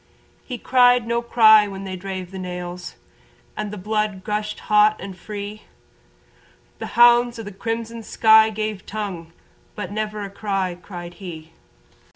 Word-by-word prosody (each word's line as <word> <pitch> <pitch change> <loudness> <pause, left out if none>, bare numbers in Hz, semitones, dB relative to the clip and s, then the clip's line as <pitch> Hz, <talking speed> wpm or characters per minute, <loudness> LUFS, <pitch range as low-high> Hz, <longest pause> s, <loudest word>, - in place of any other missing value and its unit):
He 250 - -6
cried 245 0 +4
no 235 +1 0
cry 220 -3 +6
when 195 -1 -7
they 190 -1 -5
drave 185 -1 -6
the 190 - -7
nails 180 -1 -6 0.6
And 210 - -4
the 210 - -7
blood 210 -1 -2
gushed 210 0 -3
hot 210 0 +4
and 195 -1 -7
free, 205 +2 -7 1.2
The - - -5
hounds 240 0 +6
of 225 - -7
the 205 - -7
crimson 225 +3 -4
sky 220 0 +5
gave 215 -2 -4
tongue 190 -6 -5 0.4
But 205 -3 -5
never 215 0 -3
a 200 - -7
cry 195 -3 -2
cried 175 -1 -9
he. 165 -3 -8
210 Hz, 150 wpm, -22 LUFS, 190-220 Hz, 1.2 s, cry